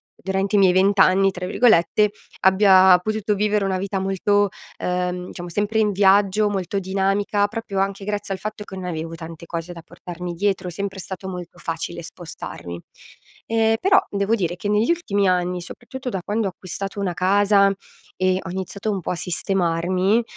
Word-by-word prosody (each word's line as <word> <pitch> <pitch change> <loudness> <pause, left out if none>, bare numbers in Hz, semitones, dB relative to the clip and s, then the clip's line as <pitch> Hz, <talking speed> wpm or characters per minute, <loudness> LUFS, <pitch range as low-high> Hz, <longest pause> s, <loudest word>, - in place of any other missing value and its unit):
durante 195 +1 -1
i - - +5
miei 190 -2 +6
“20 195 +2 +3
anni”, 195 +1 +5
tra 180 0 -5
virgolette, 210 -1 +3 0.3
abbia 190 -1 +6
potuto 215 +2 -1
vivere 210 0 +1
una 190 -1 -1
vita 195 0 -2
molto 200 +2 +1 0.3
ehm, 180 0 -2
diciamo, 175 -1 -7
sempre 205 +5 0
in 210 -1 +3
viaggio, 200 +1 +4
molto 195 -1 -2
dinamica, 195 +2 0
proprio 210 -2 -4
anche 195 0 -1
grazie 205 -1 -3
al - - -11
fatto 215 0 -5
che 195 - -10
non 185 -1 -6
avevo 165 -1 -4
tante 165 0 -9
cose 170 +1 -5
da 170 - -10
portarmi 175 +1 -8
dietro. 190 0 -1
È - - -7
sempre 195 +2 -5
stato 190 +1 -7
molto 180 -2 -7
facile 170 0 -5
spostarmi. 160 - -8 0.7
Ehm, 225 0 +2
però 390 +1 +5
devo 200 +2 +1
dire 175 -5 -2
che 195 +3 -4
negli 210 +7 +2
ultimi 205 - 0
anni, 180 0 0
soprattutto 250 +8 -7
da 190 -6 -3
quando 215 +3 -1
ho - - -1
acquistato 195 +2 -6
una 190 -3 -1
casa 200 +1 +4 0.4
e 185 0 +1
ho - - -8
iniziato 190 +3 -4
un 195 -2 -2
po' - - -3
a - - -1
sistemarmi, 185 +4 0
195 Hz, 180 wpm, -22 LUFS, 180-205 Hz, 0.7 s, miei